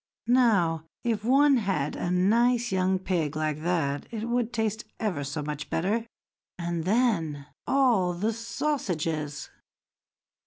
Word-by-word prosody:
Now, 205 -10 +3 0.2
if 225 -3 -1
one 275 +3 +5
had 195 - -1
a - - -2
nice 235 +7 +3
young 190 0 +2
pig 170 -5 -1
like 155 -1 -1
that, 160 -5 -1
it 225 -1 -4
would 240 -1 0
taste 220 -2 -1 0.2
ever 185 -10 -1
so 145 +2 -4
much 150 0 -5
better; 215 +7 0 0.5
and 170 -2 -3
then, 185 - +1 0.2
all 240 -10 +3
the 210 +6 -1
sausages!" 170 - -2
190 Hz, 125 wpm, -27 LUFS, 160-230 Hz, 0.5 s, one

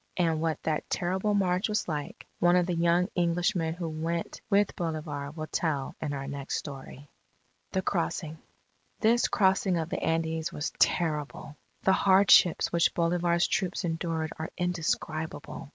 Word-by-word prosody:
And 165 -3 +1
what 160 -1 -1
that 155 -1 -2
terrible 190 +3 0
march 185 0 +1
was 210 - -1
like, 150 -3 -5
one 175 0 +4
of 180 -1 +3
the 180 - -1
young 170 +1 +2
Englishmen 170 -1 +1
who 175 -1 -4
went 165 +2 -3
with 200 0 +2
Bolivar, 155 -4 -4
will 155 +1 -6
tell 150 -4 -2
in 150 - -2
our 135 -1 -4
next 140 -1 -4
story. 140 0 -7 0.7
THE 190 - 0
CROSSING 165 -4 -2 0.6
This 235 +2 +3
crossing 190 -2 +2
of 165 0 -2
the - - -3
Andes 160 0 -1
was 150 - -4
terrible. 150 -3 0 0.3
The 190 - +4
hardships 190 -2 +5
which 170 -1 +2
Bolivar's 170 0 +2
troops 185 0 -1
endured 165 -1 -2
are 160 - -4
indescribable. 160 -2 -3
170 Hz, 150 wpm, -28 LUFS, 155-180 Hz, 0.7 s, hardships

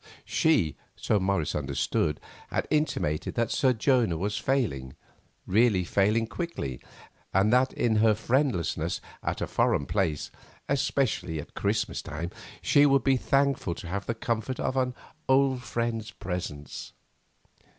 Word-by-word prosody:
She, 145 - +2 0.2
so 105 - +1
Morris 95 -5 0
understood, 70 +1 0 0.3
had - - -1
intimated 150 - 0
that 115 -1 0
Sir 130 - +3
Jonah 120 - +2
was 100 +5 -1
failing, 100 - -1 0.5
really 105 -1 +3
failing 105 +5 +2
quickly, 115 - -4 0.5
and 100 +4 +4
that 130 +1 +4
in 110 -2 +1
her 110 0 +5
friendlessness 110 - 0 0.2
at - - -3
a - - +1
foreign 70 - +1
place, 85 -7 -1 0.4
especially 135 - 0
at 75 - -9
Christmas - - -1
time, 80 +4 -5 0.3
she 145 0 +5
would 140 -1 +3
be 135 -1 +4
thankful 135 -8 +1
to 85 - -8
have 100 +2 -3
the 115 - -1
comfort 115 +3 -2
of 130 - -1
an 130 -1 0 0.3
old 130 -1 +4
friend's 115 -1 -2
presence. 90 -8 -6
110 Hz, 135 wpm, -28 LUFS, 85-130 Hz, 0.5 s, her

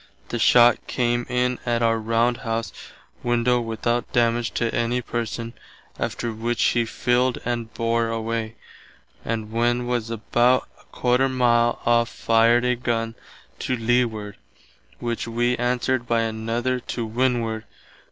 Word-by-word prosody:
The 120 - -3
shott 120 +1 +5
come 120 -1 0
in 125 0 0
at 120 -1 0
our 115 0 +2
round 115 +2 +1
house 115 -2 -3 0.5
window 120 0 +2
without 120 +1 -2
damage 120 -2 +2
to 115 -1 0
any 120 +1 0
person, 115 -1 -4 0.5
after 115 -1 -2
which 115 +2 -1
he 120 -1 +2
filled 125 +2 +1
and 120 -2 -2
bore 115 0 +1
away, 115 0 -3 0.7
and 110 -1 -3
when 120 +2 +1
was 120 -2 -1
about 120 +3 +2 0.3
¼ 125 +2 +2
mile 120 -2 +2
off 120 0 +3
fired 115 +2 +3
a 125 0 +2
gunn 115 -2 -2 0.5
to 130 - -1
leeward, 115 -3 0 0.6
which 120 -1 -3
wee 120 +1 +1
answered 125 0 0
by 115 -1 +2
another 115 +3 -1
to 120 -1 -4
windward. 115 -1 -1
120 Hz, 135 wpm, -23 LUFS, 115-120 Hz, 0.7 s, shott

